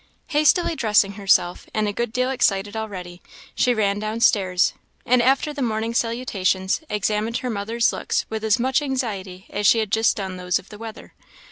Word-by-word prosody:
Hastily 325 +3 +3
dressing 210 -6 +3
herself, 195 -3 +1
and 215 -1 +1
a 205 - -2
good 235 +1 -2
deal 255 +2 0
excited 205 -5 +1
already, 185 -5 -6 0.3
she 250 - +2
ran 205 -3 +1
down 215 +2 -3
stairs, 190 -6 +3 0.3
and, 250 0 +4
after 270 +4 +2
the 290 - -5
morning 225 -1 -1
salutations, 225 - 0
examined 210 +2 -1
her 250 - -1
mother's 225 +3 0
looks - - -1
with 220 0 -5
as 220 -1 +3
much 260 +3 +1
anxiety 205 -9 -4
as 205 0 +1
she 230 - +6
had 215 -3 -1
just 225 +1 +3
done 190 -2 -4
those 180 -1 0
of 185 - -11
the 210 - -11
weather. 225 -1 -9
220 Hz, 180 wpm, -22 LUFS, 200-240 Hz, 0.3 s, she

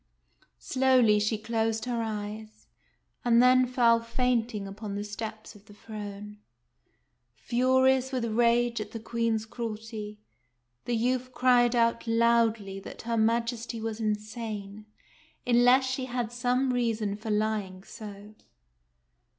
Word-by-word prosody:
Slowly 255 -5 +3
she 215 +1 0
closed 225 +1 -1
her 240 -2 -2
eyes, 215 0 -6 0.6
and 235 -1 +4
then 255 +1 +5
fell 235 -2 +4
fainting 230 -3 -1
upon 200 +1 -6
the 205 - -3
steps 215 +1 -7
of 205 -1 -18
the 205 - -16
throne. 210 -1 -8 1.0
Furious 260 - +2
with 255 -3 -1
rage 235 +1 +2
at 215 - -8
the 225 - -5
Queen's 225 -1 -1
cruelty, 220 -2 -6 0.7
the 240 - -1
youth 250 +2 0
cried 245 -1 +4
out 230 0 +1
loudly 230 -3 +2
that - - -10
her 230 0 -2
Majesty 230 +1 0
was 220 0 -4
insane, 215 -1 -4 0.6
unless 245 +2 +5
she 260 0 -2
had 245 -2 -3
some 250 +2 0
reason 225 -4 -1
for 215 +2 -7
lying 210 -3 -1
so. 205 0 -10
230 Hz, 125 wpm, -28 LUFS, 215-240 Hz, 1.0 s, then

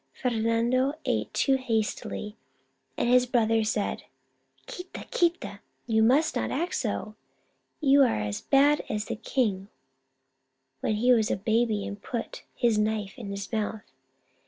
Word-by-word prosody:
Fernando 240 +3 +1
ate - - -1
too 270 -1 +2
hastily, 220 -3 -3 0.6
and - - 0
his 250 +1 +4
brother 225 -2 +2
said: 215 -1 -2 0.3
" - - -39
ghiita, 360 0 -8
quita! 345 0 0 0.3
You 220 -2 +2
must 265 +8 +3
not - - -1
act 340 +6 -2
so! 215 -2 -2 0.7
You 280 -1 +5
are 250 - +3
as 105 0 -3
bad 285 +2 +4
as 210 0 -2
the - - -4
king 210 -5 -1 1.1
when 215 - 0
he 245 +4 +4
was 220 -3 +2
a - - 0
baby 220 0 +1
and 200 0 -7
put 235 +1 -5
his 230 -3 +2
knife 210 -2 -1
in 220 -5 -8
his 200 -1 -6
mouth. 215 -1 -2
225 Hz, 145 wpm, -27 LUFS, 210-255 Hz, 1.1 s, You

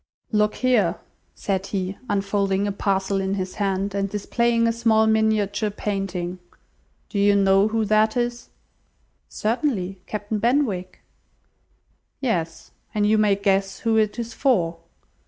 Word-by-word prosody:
"Look 210 -1 +2
here," 220 -9 +2 0.4
said 195 -1 -2
he, 190 -1 -3
unfolding 200 0 0
a 205 - -1
parcel 195 -1 0
in 190 +1 -1
his 185 -1 -4
hand, 195 0 0
and 200 0 -1
displaying 230 +3 +1
a - - +3
small 225 -1 +3
miniature 220 -1 +1
painting, 195 -3 -3 0.7
"do 200 - -3
you 200 0 +4
know 195 0 +4
who 220 0 0
that 215 +2 +2
is?" 240 0 -2 0.8
"Certainly: 210 -6 -2
Captain 210 0 -3
Benwick." 230 -7 0 1.2
"Yes, 170 - -2 0.2
and 210 -1 +2
you 215 +1 +3
may 210 -2 +4
guess 195 -1 0
who 225 -1 +1
it 215 0 +1
is 235 0 -4
for. 175 -11 +1
205 Hz, 135 wpm, -23 LUFS, 195-220 Hz, 1.2 s, you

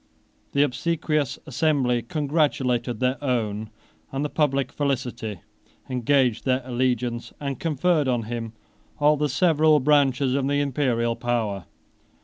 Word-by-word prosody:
The 140 - +4
obsequious 150 +1 -1
assembly 135 -4 +1
congratulated 135 -4 0
their 130 +2 0
own 110 -5 -1 0.4
and 135 +1 -2
the - - -2
public 140 -4 +1
felicity; 125 - -3 0.5
engaged 125 -1 +2
their 130 0 +1
allegiance, 125 -1 -1
and 140 -2 -4
conferred 160 -1 +1
on 120 -3 +1
him 115 0 -5 0.4
all 150 0 +4
the 150 0 0
several 155 +1 +4
branches 135 -2 +3
of 135 0 0
the 145 0 +1
Imperial 125 -5 0
power. 110 -7 -2
130 Hz, 125 wpm, -24 LUFS, 120-145 Hz, 0.5 s, The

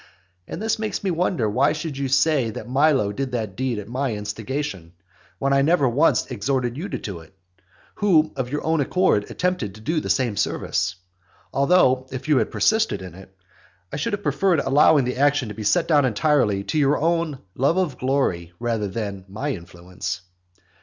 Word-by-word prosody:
And - - -6
this 220 +1 -1
makes 215 -1 -3
me 190 - 0
wonder 170 - 0
why 125 +6 +2
you - - -1
should 140 -4 -4
say 135 -3 +3
that 110 0 -7
Milo 135 -5 +3
did 130 +4 -4
that 110 -5 -3
deed 130 -1 -1
at 105 - -6
my 125 0 -2
instigation; 105 - -5 0.4
when 140 0 +1
I 140 - +4
never 150 -1 +3
once 135 +7 +3
exhorted 125 +1 -1
you 175 +8 -5
to - - -3
do 95 -5 -6
it, 80 +4 -17 0.6
who 160 -7 +3
of 130 -3 -3
your 145 - -2
own 160 -1 +1
accord 140 - +1
attempted 180 - -2
to 110 - -13
do 135 +9 -2
me 160 - +2
the - - -5
same 120 -6 +1
service. 95 0 -1 0.6
Although, 135 -3 +3
if 130 +3 -6
you 150 -3 +4
had 110 - 0
persisted 220 - +1
in 90 -3 -9
it, 95 +1 -15 0.6
I - - -2
should 150 - -2
have 205 0 -3
preferred 190 -6 +2
allowing 140 +1 +4
the 125 - -3
action 145 -3 +2
to - - -6
be 110 - -8
set 105 0 +2
down 150 -3 +4
entirely 125 -5 +2
to 155 - -1
your 145 0 +3
own 165 -2 0 0.2
love 140 +7 +1
of 180 -7 -1
glory 125 -11 0
rather 115 -3 -1
than 100 -2 -5
to 95 - -21
my 135 +9 -3
influence. 90 -1 -6
130 Hz, 195 wpm, -23 LUFS, 105-155 Hz, 0.6 s, I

